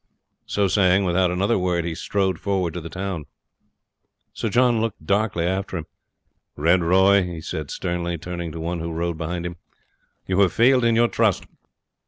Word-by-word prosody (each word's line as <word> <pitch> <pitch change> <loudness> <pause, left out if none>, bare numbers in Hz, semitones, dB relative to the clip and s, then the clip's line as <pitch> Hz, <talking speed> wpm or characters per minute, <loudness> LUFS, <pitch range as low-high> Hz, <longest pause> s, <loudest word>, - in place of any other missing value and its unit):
So 100 -1 +1
saying, 95 0 +3
without 90 0 +2
another 95 +5 +1
word 90 -2 0
he 85 - -2
strode 95 +2 -1
forward 95 -5 -1
to 90 - -5
the 85 - -8
town. 95 -4 -4 1.1
Sir 115 - -2
John 120 0 +3
looked 110 -8 -4
darkly 100 -3 +1
after 95 +1 -2
him. 80 - -5 0.7
"Red 85 +5 +3
Roy," 95 +4 +4
he 90 -2 -4
said 80 -2 -5
sternly, 85 -1 -3
turning 85 0 -5
to 80 - -7
one 85 +2 -3
who 85 +1 -4
rode 85 0 -3
behind 85 +1 -3
him, 85 0 -5 0.7
"you 95 0 0
have 95 -3 +4
failed 125 +2 +4
in 115 -1 +3
your 120 +1 +4
trust. 110 -5 +1
90 Hz, 175 wpm, -23 LUFS, 85-100 Hz, 1.1 s, Roy